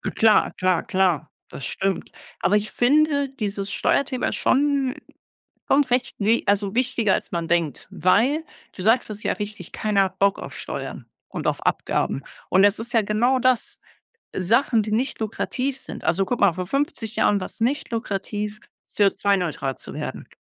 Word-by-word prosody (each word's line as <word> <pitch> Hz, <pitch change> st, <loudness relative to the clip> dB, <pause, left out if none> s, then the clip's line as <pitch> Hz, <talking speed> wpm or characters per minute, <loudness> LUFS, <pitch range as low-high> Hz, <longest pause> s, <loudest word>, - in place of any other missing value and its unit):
Klar, 220 Hz, -1 st, +4 dB
klar, 185 Hz, -2 st, +2 dB
klar, 185 Hz, -8 st, +1 dB, 0.2 s
das 135 Hz, -, -8 dB
stimmt, 195 Hz, +9 st, -2 dB, 0.3 s
aber 210 Hz, -, +3 dB
ich 210 Hz, +1 st, -3 dB
finde 285 Hz, +2 st, +3 dB
dieses 200 Hz, -6 st, -4 dB
Steuerthema 265 Hz, -2 st, 0 dB
schon 275 Hz, -1 st, +1 dB, 0.7 s
schon 285 Hz, +1 st, +5 dB
recht 245 Hz, -3 st, -1 dB
ne 220 Hz, +3 st, +3 dB
also 200 Hz, 0 st, +1 dB
wichtiger, 240 Hz, -5 st, +1 dB
als -, -, -4 dB
man 170 Hz, -1 st, -2 dB
denkt, 165 Hz, -6 st, 0 dB
weil 255 Hz, -, +2 dB, 0.3 s
du 185 Hz, -, -7 dB
sagst 225 Hz, +2 st, +3 dB
es 210 Hz, 0 st, -6 dB
ja -, -, +1 dB
richtig: 205 Hz, -4 st, -7 dB
„Keiner 205 Hz, -2 st, +2 dB
hat 190 Hz, 0 st, -6 dB
Bock 200 Hz, 0 st, +3 dB
auf -, -, -8 dB
Steuern -, -, -6 dB, 0.2 s
und -, -, -5 dB
auf -, -, -1 dB
Abgaben”, -, -, 0 dB, 0.3 s
und 190 Hz, +1 st, +5 dB
es 205 Hz, +1 st, +4 dB
ist 235 Hz, +1 st, -5 dB
ja 225 Hz, -, +5 dB
genau 235 Hz, +6 st, +2 dB
das. 255 Hz, -2 st, +1 dB, 0.6 s
Sachen, 225 Hz, +4 st, +3 dB
die 215 Hz, 0 st, -5 dB
nicht 250 Hz, +2 st, -1 dB
lukrativ 255 Hz, +5 st, -2 dB
sind -, -, -8 dB
also 190 Hz, +2 st, +1 dB
guck 245 Hz, -, -1 dB
mal, 200 Hz, -3 st, +5 dB
vor 180 Hz, +1 st, -4 dB
50 275 Hz, -, -2 dB
Jahren 205 Hz, -1 st, +3 dB
war's 185 Hz, -, -7 dB
nicht 260 Hz, +6 st, 0 dB
lukrativ, 210 Hz, -1 st, -3 dB, 0.3 s
CO₂-neutral 190 Hz, -8 st, +1 dB
zu -, -, -9 dB
werden, -, -, -6 dB
215 Hz, 165 wpm, -23 LUFS, 195-250 Hz, 0.7 s, schon